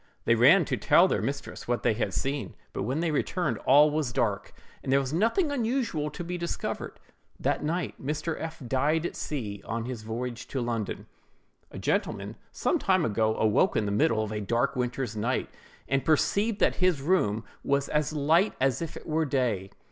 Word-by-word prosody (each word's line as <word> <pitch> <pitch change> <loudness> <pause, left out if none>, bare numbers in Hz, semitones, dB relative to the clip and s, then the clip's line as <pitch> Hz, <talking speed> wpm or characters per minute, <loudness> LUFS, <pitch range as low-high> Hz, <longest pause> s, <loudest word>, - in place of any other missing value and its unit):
They 115 - +5
ran 140 +10 +6
to 130 -3 -1
tell 170 - +5
their - - 0
mistress 140 0 -5
what 120 0 -1
they - - +3
had 105 -2 -1
seen; 135 - -3 0.2
but - - -3
when 135 +6 -1
they 170 -2 0
returned, 175 +4 -1
all 145 +3 +7
was 150 -4 -1
dark, 105 -5 -1 0.3
and 130 - -3
there 135 - +5
was 135 +1 -3
nothing 230 - +2
unusual 230 - -1
to 175 - -7
be 175 +1 -4
discovered. 170 0 -4 0.4
That - - 0
night 170 +1 -3
Mr. 155 +3 -2
F—— 160 -3 -6
died 150 +6 +1
at - - -3
sea, 105 -9 -4
on 115 +1 -3
his 125 -3 -5
voyage 115 +2 -5
to 135 - -3
London. 115 -4 -3 0.6
A - - -10
gentleman, - - -1 0.2
some - - 0
time - - +2
ago, 110 0 +1
awoke 110 -1 +3
in 105 - +1
the 100 - -1
middle 110 +2 +2
of 110 - -5
a 105 -1 -3
dark 120 +7 0
winter's 125 -2 -2
night, 120 +5 -1 0.4
and 135 0 +1
perceived 200 +7 +2
that - - +3
his 180 -5 +2
room 135 - +1 0.2
was 140 0 +1
as 150 -1 0
light 155 +6 +2
as 135 0 +1
if 165 - -5
it - - -11
were 160 0 0
day. 120 -9 0
135 Hz, 195 wpm, -28 LUFS, 115-160 Hz, 0.6 s, all